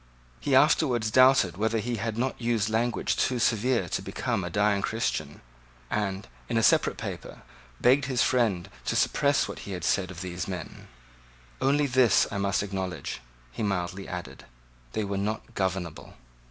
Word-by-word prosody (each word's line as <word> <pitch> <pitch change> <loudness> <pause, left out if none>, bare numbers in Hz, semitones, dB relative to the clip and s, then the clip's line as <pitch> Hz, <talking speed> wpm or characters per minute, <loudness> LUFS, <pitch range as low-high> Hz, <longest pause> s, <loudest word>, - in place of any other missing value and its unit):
He - - +1
afterwards 115 -4 +3
doubted 130 -8 +5
whether 110 +2 +1
he 115 +2 -2
had 110 +1 -3
not 130 +1 -2
used 115 -3 0
language 115 +2 0
too 130 - +1
severe 115 -3 +1
to - - -2
become 95 - -2
a 90 - -3
dying 100 +2 +2
Christian, 115 +3 -2 0.5
and, 100 -2 -2 0.2
in - - 0
a - - +2
separate - - +3
paper, - - -7 0.4
begged 130 +2 +4
his 130 -2 +1
friend 105 -8 +1 0.2
to - - -1
suppress 145 -1 +2
what - - -7
he 100 - -7
had 90 - -5
said 95 -2 +1
of 95 0 -8
these 90 +1 -4
men 90 -4 -7 0.7
"Only 140 +2 +3
this 130 -4 +4
I 100 - -2
must 100 0 +1
acknowledge," 95 -8 -4 0.3
he - - -7
mildly 95 -2 -2
added; 90 -1 -7 0.5
"they 110 - -1
were 100 -1 -2
not 110 +3 -3
governable." 95 -5 -3
105 Hz, 165 wpm, -27 LUFS, 95-120 Hz, 0.7 s, doubted